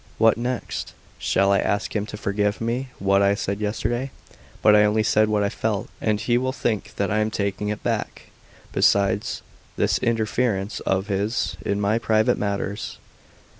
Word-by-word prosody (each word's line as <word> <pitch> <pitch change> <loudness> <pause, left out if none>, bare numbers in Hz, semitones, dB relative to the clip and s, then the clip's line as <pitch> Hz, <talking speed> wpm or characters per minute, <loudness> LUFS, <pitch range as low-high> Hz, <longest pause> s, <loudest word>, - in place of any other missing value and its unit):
"What 115 -1 +5
next? 120 +1 -4 0.3
Shall 100 0 +2
I 100 - +4
ask 100 +2 -1
him 105 0 -1
to 105 - -7
forgive 105 0 0
me 120 +4 -2
what 100 0 +3
I 100 0 +4
said 100 -1 -3
yesterday? 120 +5 -1 0.5
But 105 - +7
I 105 - +6
only 105 +1 +2
said 110 0 +3
what 105 -1 +2
I 100 - +1
felt, 110 +1 -2
and 105 -1 +1
he 120 +3 +2
will 130 +1 -1
think 115 -5 -2
that 100 +1 -1
I 110 - +2
am 110 0 +1
taking 100 -1 -2
it 105 - -4
back. - - -3 0.4
Besides, 100 +1 +2 0.3
this - - +2
interference 110 -2 0
of 95 0 +1
his 100 +3 -1
in 100 - -1
my 105 +3 +1
private 110 -1 +2
matters. 100 0 -3
105 Hz, 170 wpm, -23 LUFS, 100-110 Hz, 0.5 s, But